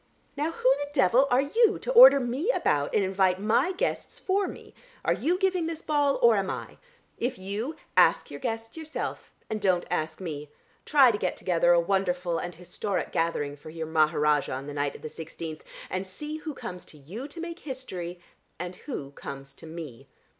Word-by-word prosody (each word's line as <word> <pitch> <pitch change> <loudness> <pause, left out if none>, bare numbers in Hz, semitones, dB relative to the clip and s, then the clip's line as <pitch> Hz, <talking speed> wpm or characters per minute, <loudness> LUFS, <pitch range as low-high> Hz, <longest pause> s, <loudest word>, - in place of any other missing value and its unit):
Now 295 +3 0
who 265 -5 +3
the 285 0 -3
devil 265 -1 +4
are 250 +2 +4
you 435 +9 +3
to - - -4
order - - +10
me 260 - -2
about 145 - +1
and 200 - +4
invite 190 -1 +2
my 220 - +2
guests 405 +7 -2
for 390 0 0
me? - - -10 0.3
Are - - +4
you 350 +3 0
giving 370 -3 +1
this 330 -1 -5
ball, 290 -2 +2
or 235 -2 +7
am 195 -1 0
I? - - -6 0.4
If 245 +2 -1
you, 205 +10 -4 0.2
ask - - +4
your - - -7
guests 225 -2 -4
yourself, 320 -1 -5 0.2
and 215 -1 -3
don't 185 -3 +2
ask 155 -2 -1
me. 150 -5 -6 0.4
Try 275 -5 +6
to 210 - -3
get 185 - -1
together 175 -1 +2
a 175 - +6
wonderful 180 -1 0
and 175 -1 -5
historic 185 +3 -3
gathering 150 -3 -1
for 145 +2 -12
your 160 0 -5
Maharajah 150 -2 +2
on 135 +1 -4
the 145 - -6
night 145 0 -1
of - - -12
the - - -3
sixteenth 160 0 -7 0.2
and 185 +1 -3
see 300 +11 -5
who 310 -2 -6
comes 180 -6 -7
to 155 - -14
you 190 - -7
to 315 +4 -10
make 340 +1 -6
history, 185 - -6 0.4
and 180 +1 -6
who 145 - -6
comes 135 -1 -8
to - - -13
me. 150 -6 -9
195 Hz, 195 wpm, -27 LUFS, -, 0.4 s, order